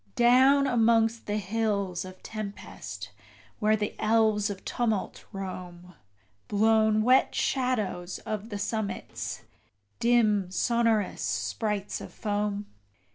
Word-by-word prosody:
Down 260 +4 +5
amongst 230 -2 +2
the 205 0 0
hills 200 -3 -1
of 185 0 -12
tempest, 200 - -7 0.5
where 215 0 +3
the 210 -1 -2
elves 215 -1 +3
of 195 -1 -7
tumult 220 -5 -2
roam 180 -2 -7 0.5
Blown 215 0 +3
wet 255 +3 +4
shadows 215 -9 -1
of 215 +1 -4
the 205 - -4
summits, 210 0 -4 0.6
dim 215 -5 +3
sonorous 225 0 +1
sprites 110 - -2
of - - -8
foam? 205 -1 -2
215 Hz, 105 wpm, -28 LUFS, 195-225 Hz, 0.6 s, Down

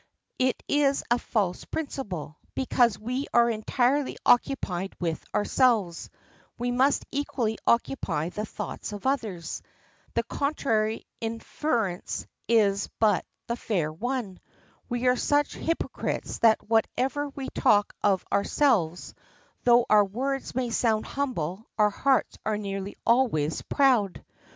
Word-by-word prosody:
It 260 0 +1
is 280 -1 +2
a 240 - +4
false 195 -8 -1
principle, 195 - -5 0.2
because 245 -5 +2
we 250 +5 -3
are 235 0 +5
entirely 250 +5 +1
occupied 195 -7 +2
with 165 -2 -2
ourselves, 210 -4 +2 0.5
we 245 +1 -1
must 265 +3 +2
equally 250 -6 -1
occupy 175 - +1
the 210 +4 -4
thoughts 210 - -6
of 205 - -8
others. 210 - -2 0.5
The - - +2
contrary 225 -7 -1
inference 225 - -2 0.2
is 205 -3 +3
but 210 -5 +3 0.2
the 235 - -2
fair 175 -10 -1
one. 230 0 -3 0.5
We 245 0 -2
are 250 0 +5
such 290 +3 +1
hypocrites 330 0 -3
that 225 -1 +4
whatever 260 +6 +1
we 275 -1 -6
talk 205 -1 +3
of 195 -2 +2
ourselves, 200 - +1 0.5
though 240 -1 +6
our 210 -1 +6
words 265 +8 -3
may 250 -2 -1
sound 225 -2 +1
humble, 220 - -3
our 210 -1 +4
hearts 265 +5 +1
are 215 -1 0
nearly 195 -1 -4
always 225 - +2
proud. 245 -9 +2
230 Hz, 120 wpm, -27 LUFS, 200-260 Hz, 0.5 s, though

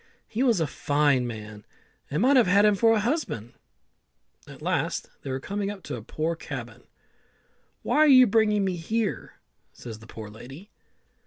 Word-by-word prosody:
"He 225 - -3
was 240 -7 +3
a 160 - +1
fine 145 -3 +1
man, 105 -2 -8 0.5
and 155 - 0
I 275 - +5
might - - +4
have 200 +3 +5
him 210 - +5
for 225 +3 +4
a - - +2
husband." 210 - -2 0.9
At - - -12
last - - -1
they - - -7
were 130 0 -2
coming 200 +6 -3
up 205 -2 -8
to 145 - -5
a 120 - -7
poor 155 +8 -3
cabin. - - -8 1.0
"Why - - 0
are 310 0 +6
you 255 -3 +8
bringing 210 -2 +2
me 185 -2 -1
here?" 220 +6 -3 0.4
says 110 -3 -9
the 115 - -15
poor 110 -2 -9
lady. 135 - -12
180 Hz, 175 wpm, -26 LUFS, -, 1.0 s, you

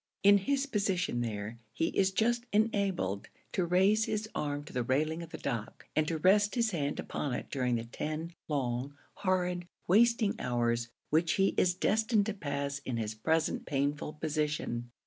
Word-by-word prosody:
In 200 0 +7
his 275 +6 0
position 190 - 0
there, 110 0 -4
he 165 - 0
is 190 -1 +2
just 235 +5 +1
enabled 200 - +1 0.2
to 185 - +1
raise 195 +5 +4
his 215 0 -2
arm 145 -1 -2
to - - -12
the 125 - 0
railing 155 +7 0
of 165 - -8
the - - -7
dock, 115 -6 -4
and 155 0 +2
to 165 - 0
rest 205 +7 +4
his 230 -2 +2
hand 145 -5 -1
upon 140 -4 -2
it - - -6
during 125 -3 +1
the 115 - -2
ten 155 +7 -4
long, 135 -1 -2 0.2
horrid, 180 -2 0 0.2
wasting 225 +2 +4
hours 120 -1 0 0.2
which 160 +2 +3
he 195 0 +3
is 180 -1 +3
destined 220 +2 +2
to 215 - -1
pass 140 -5 -3
in 130 -4 -4
his 110 -1 -2
present 160 +9 0
painful 145 +2 -1
position. 150 -6 -2
160 Hz, 170 wpm, -31 LUFS, 130-200 Hz, 0.2 s, In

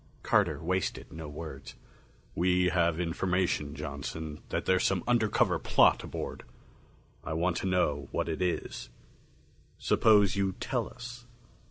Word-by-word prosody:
Carter - - +2
wasted 90 +2 -2
no 80 -1 -7
words. 75 -2 -8 0.6
"We 90 0 +2
have 85 -2 +1
information, 90 -4 0
Johnson, 75 +1 -6
that - - -2
there's 95 -1 +3
some 95 -3 +1
undercover 115 -4 +2
plot - - +4
aboard. - - -5 0.8
I 80 - -4
want 85 +2 +1
to - - -2
know 75 -7 +1
what - - -2
it 80 +1 -3
is. 90 -8 -2 0.9
Suppose 105 -3 +4
you 95 -1 0
tell 120 +4 -2
us." 120 0 -10
90 Hz, 130 wpm, -30 LUFS, 80-95 Hz, 0.9 s, plot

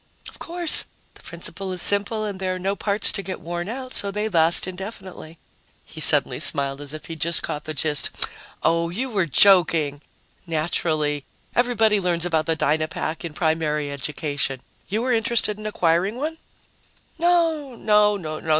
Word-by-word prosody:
"Of - - -12
course. 345 -1 +3 0.3
The - - -15
principle 195 -1 -5
is 180 - -2
simple 205 +3 +2
and 200 -2 -5
there 185 -1 -2
are 185 0 -8
no 200 - +1
parts 200 0 +1
to - - -2
get 190 -1 -6
worn 175 +2 -5
out, 255 +2 -5
so 200 - +2
they 210 +2 -2
last 170 -4 +3
indefinitely." 185 -3 -8 0.5
He - - -8
suddenly - - +4
smiled 140 0 +3
as 145 +1 -6
if 155 -1 -9
he'd 160 0 -8
just 170 0 +2
caught 150 - -4
the 155 - -6
gist. 150 0 +1 0.5
"Oh, 165 0 +1
you 245 +9 -3
were 195 -6 0
joking! 155 -3 +4 0.5
Naturally 155 -2 -1 0.3
everybody 225 -4 +2
learns 175 -2 0
about 160 -2 0
the 165 - +1
Dynapack 155 +2 -1
in 165 -3 -7
primary 155 -3 -1
education. 140 -1 -3 0.3
You 215 +5 -1
were 255 0 +1
interested 225 -2 +1
in 215 - -5
acquiring 180 +1 +1
one?" 315 +4 -4 0.8
"No, 330 -6 +1
no. 210 -2 +3
180 Hz, 160 wpm, -23 LUFS, 155-210 Hz, 0.8 s, suddenly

